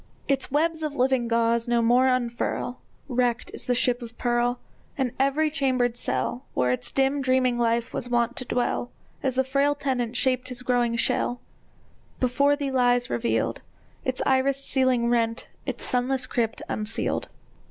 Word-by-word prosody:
Its 275 Hz, -1 st, 0 dB
webs 320 Hz, +3 st, +1 dB
of 305 Hz, -2 st, -3 dB
living 255 Hz, -2 st, +2 dB
gauze 230 Hz, 0 st, +1 dB
no 240 Hz, 0 st, +2 dB
more 245 Hz, +3 st, +4 dB
unfurl; 245 Hz, 0 st, -1 dB, 0.3 s
Wrecked 245 Hz, -2 st, 0 dB
is -, -, -8 dB
the 250 Hz, -, +2 dB
ship 245 Hz, 0 st, +1 dB
of 235 Hz, 0 st, -9 dB
pearl! 240 Hz, 0 st, +1 dB, 0.4 s
And 260 Hz, -3 st, 0 dB
every 290 Hz, +3 st, +2 dB
chambered 255 Hz, -5 st, +1 dB
cell, 245 Hz, +1 st, -2 dB
Where 125 Hz, 0 st, +2 dB
its 125 Hz, +1 st, -2 dB
dim 270 Hz, +1 st, +1 dB
dreaming 255 Hz, -2 st, +2 dB
life 235 Hz, +1 st, +1 dB
was 245 Hz, -, -4 dB
wont 240 Hz, 0 st, +1 dB
to 255 Hz, -, -3 dB
dwell, 245 Hz, 0 st, -1 dB, 0.3 s
As 260 Hz, -2 st, -1 dB
the 265 Hz, -, +3 dB
frail 280 Hz, +2 st, +1 dB
tenant 250 Hz, -4 st, -1 dB
shaped 255 Hz, -1 st, +1 dB
his 250 Hz, 0 st, -7 dB
growing 245 Hz, -2 st, +1 dB
shell, 245 Hz, +1 st, 0 dB, 0.8 s
Before 280 Hz, +3 st, +3 dB
thee 285 Hz, -2 st, -3 dB
lies 245 Hz, -1 st, +2 dB
revealed, 235 Hz, 0 st, 0 dB, 0.4 s
Its 260 Hz, -2 st, -2 dB
irised 270 Hz, +1 st, +2 dB
ceiling 255 Hz, -3 st, +2 dB
rent, 230 Hz, -1 st, 0 dB, 0.2 s
its -, -, -3 dB
sunless 255 Hz, +1 st, 0 dB
crypt 235 Hz, -3 st, -1 dB
unsealed! 215 Hz, +1 st, -2 dB
250 Hz, 160 wpm, -25 LUFS, 240-265 Hz, 0.8 s, more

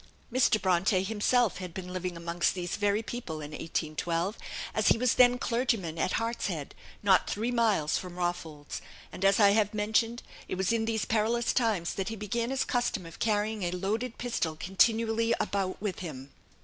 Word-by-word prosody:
Mr. 245 Hz, -4 st, +4 dB
Bronte 185 Hz, +1 st, +2 dB
himself 220 Hz, +1 st, +1 dB
had 180 Hz, -3 st, -7 dB
been 180 Hz, -1 st, -6 dB
living 180 Hz, -1 st, -3 dB
amongst 170 Hz, +1 st, 0 dB
these 175 Hz, -1 st, -3 dB
very 205 Hz, +1 st, +1 dB
people 230 Hz, -8 st, -5 dB
in 150 Hz, 0 st, -7 dB
1812, 165 Hz, +5 st, -2 dB, 0.4 s
as 215 Hz, -, +1 dB
he -, -, +6 dB
was 250 Hz, +1 st, +2 dB
then 245 Hz, 0 st, +6 dB
clergyman 230 Hz, -10 st, -1 dB
at 180 Hz, -, 0 dB
Hartshead, 205 Hz, -10 st, -2 dB, 0.3 s
not 190 Hz, -2 st, +4 dB
three 225 Hz, +4 st, -1 dB
miles 220 Hz, -11 st, +2 dB
from 180 Hz, -1 st, -8 dB
Rawfolds; 165 Hz, -4 st, -4 dB, 0.3 s
and, 185 Hz, -, -7 dB
as 195 Hz, +1 st, +4 dB
I 200 Hz, -2 st, +7 dB
have 210 Hz, 0 st, +2 dB
mentioned, 225 Hz, +3 st, +1 dB, 0.2 s
it -, -, -3 dB
was 190 Hz, +3 st, +1 dB
in 225 Hz, -1 st, +1 dB
these 225 Hz, -1 st, -1 dB
perilous 230 Hz, +2 st, +1 dB
times 215 Hz, -9 st, +1 dB
that 195 Hz, 0 st, -3 dB
he 225 Hz, -, -4 dB
began 230 Hz, +3 st, -2 dB
his 270 Hz, 0 st, 0 dB
custom 245 Hz, -7 st, -1 dB
of 165 Hz, -, -11 dB
carrying 215 Hz, 0 st, 0 dB
a 175 Hz, -, 0 dB
loaded 215 Hz, +7 st, -2 dB
pistol 230 Hz, -10 st, -2 dB
continually 225 Hz, +6 st, +2 dB
about 195 Hz, -2 st, -1 dB
with 205 Hz, -2 st, -3 dB
him. 140 Hz, -6 st, -7 dB
205 Hz, 175 wpm, -29 LUFS, 175-230 Hz, 0.4 s, I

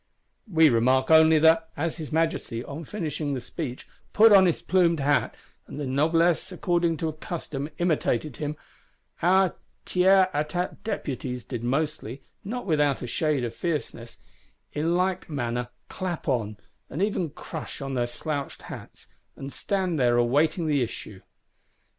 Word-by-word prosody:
We 160 Hz, -2 st, +6 dB
remark 130 Hz, +4 st, +3 dB
only 160 Hz, 0 st, +7 dB
that, 160 Hz, +1 st, +4 dB
as 165 Hz, +3 st, -2 dB
his 155 Hz, -3 st, -7 dB
Majesty, 160 Hz, -7 st, -1 dB
on 150 Hz, +5 st, -7 dB
finishing 150 Hz, -6 st, -3 dB
the -, -, -2 dB
speech, 130 Hz, 0 st, -6 dB, 0.3 s
put 220 Hz, +1 st, +7 dB
on 190 Hz, -2 st, +8 dB
his 170 Hz, -, +1 dB
plumed 170 Hz, -3 st, +3 dB
hat, 140 Hz, +1 st, +1 dB, 0.3 s
and -, -, -8 dB
the 145 Hz, -, -2 dB
Noblesse 165 Hz, +7 st, +2 dB
according 175 Hz, -2 st, 0 dB
to 160 Hz, +1 st, -2 dB
custom 155 Hz, -3 st, -5 dB
imitated 155 Hz, -5 st, 0 dB
him, 150 Hz, 0 st, -3 dB, 0.7 s
our 185 Hz, +2 st, +4 dB, 0.3 s
Tiers 190 Hz, +1 st, +5 dB
Etat 155 Hz, +5 st, -2 dB
Deputies 130 Hz, -, -4 dB
did 120 Hz, -3 st, -5 dB
mostly, 135 Hz, -1 st, -2 dB, 0.2 s
not 245 Hz, +5 st, -4 dB
without 150 Hz, -, +1 dB
a -, -, -2 dB
shade 150 Hz, +1 st, 0 dB
of 120 Hz, -, -3 dB
fierceness, 145 Hz, -8 st, -4 dB, 0.6 s
in 160 Hz, +3 st, 0 dB
like 185 Hz, 0 st, -1 dB
manner 120 Hz, -4 st, -2 dB, 0.2 s
clap 180 Hz, -4 st, -5 dB
on, 110 Hz, -6 st, -1 dB, 0.3 s
and 160 Hz, +8 st, -2 dB
even 195 Hz, -5 st, 0 dB
crush 155 Hz, +2 st, -8 dB
on 135 Hz, -1 st, -4 dB
their 120 Hz, -2 st, 0 dB
slouched 140 Hz, +3 st, -4 dB
hats; -, -, -10 dB, 0.3 s
and 135 Hz, 0 st, -8 dB
stand 185 Hz, -5 st, -1 dB
there 120 Hz, -1 st, +3 dB
awaiting 150 Hz, +8 st, +2 dB
the 145 Hz, -3 st, +2 dB
issue. 105 Hz, -4 st, -5 dB
155 Hz, 145 wpm, -26 LUFS, 135-170 Hz, 0.7 s, on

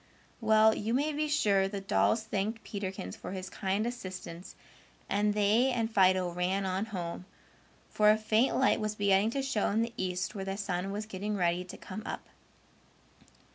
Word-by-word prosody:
Well, 220 Hz, -1 st, +5 dB
you 225 Hz, +3 st, -1 dB
may 295 Hz, +3 st, +1 dB
be 305 Hz, +1 st, 0 dB
sure 205 Hz, -10 st, +2 dB
the 200 Hz, 0 st, -4 dB
dolls 205 Hz, +3 st, +2 dB
thanked 220 Hz, +1 st, -2 dB
Peterkins 190 Hz, -, -5 dB
for -, -, -7 dB
his 190 Hz, -1 st, -6 dB
kind 195 Hz, +2 st, -1 dB
assistance 185 Hz, -7 st, -7 dB, 0.5 s
and 205 Hz, +1 st, +1 dB
they 210 Hz, +5 st, +3 dB
and 230 Hz, -2 st, -1 dB
Fido 185 Hz, -2 st, +4 dB
ran 185 Hz, +3 st, 0 dB
on 190 Hz, +2 st, -1 dB
home, 180 Hz, -4 st, -5 dB, 0.6 s
for 210 Hz, 0 st, +3 dB
a 215 Hz, -, +6 dB
faint 220 Hz, +3 st, +2 dB
light 265 Hz, -, +3 dB
was 215 Hz, -1 st, -2 dB
beginning 200 Hz, +1 st, +3 dB
to 275 Hz, +3 st, -2 dB
show 255 Hz, -6 st, 0 dB
in 220 Hz, +3 st, +2 dB
the 230 Hz, 0 st, -5 dB
east 185 Hz, 0 st, -2 dB
where 195 Hz, -2 st, -5 dB
the 195 Hz, 0 st, -3 dB
sun 195 Hz, -1 st, -2 dB
was 210 Hz, +2 st, -4 dB
getting 210 Hz, 0 st, -3 dB
ready 175 Hz, 0 st, +1 dB
to 180 Hz, -, -9 dB
come 200 Hz, +3 st, -7 dB
up. -, -, -6 dB
205 Hz, 175 wpm, -30 LUFS, 190-220 Hz, 0.6 s, a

